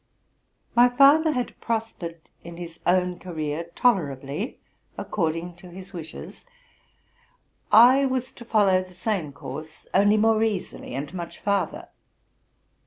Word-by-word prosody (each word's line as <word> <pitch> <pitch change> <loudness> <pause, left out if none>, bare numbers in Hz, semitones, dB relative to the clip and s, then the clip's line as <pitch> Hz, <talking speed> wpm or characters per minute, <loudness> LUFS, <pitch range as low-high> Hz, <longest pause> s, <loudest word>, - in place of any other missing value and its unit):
My 245 +1 +6
father 285 +5 +5
had 250 -2 -3
prospered 220 -8 -4 0.2
in 170 0 -10
his 170 -1 -8
own 180 0 +2
career 160 -2 -4
tolerably 150 - 0 0.4
according 170 -1 -2
to 180 0 -13
his 190 +2 -11
wishes: 165 -3 -9 1.3
I 255 +5 +7
was 255 0 -2
to 245 - -12
follow 205 -5 +3
the 185 -1 -12
same 185 -5 -2
course, 155 +2 -9
only 205 +2 +4
more 220 0 +3
easily, 210 - -3
and 140 +4 -5
much 170 -2 -6
farther. 200 -1 -2
185 Hz, 120 wpm, -25 LUFS, 170-225 Hz, 1.3 s, I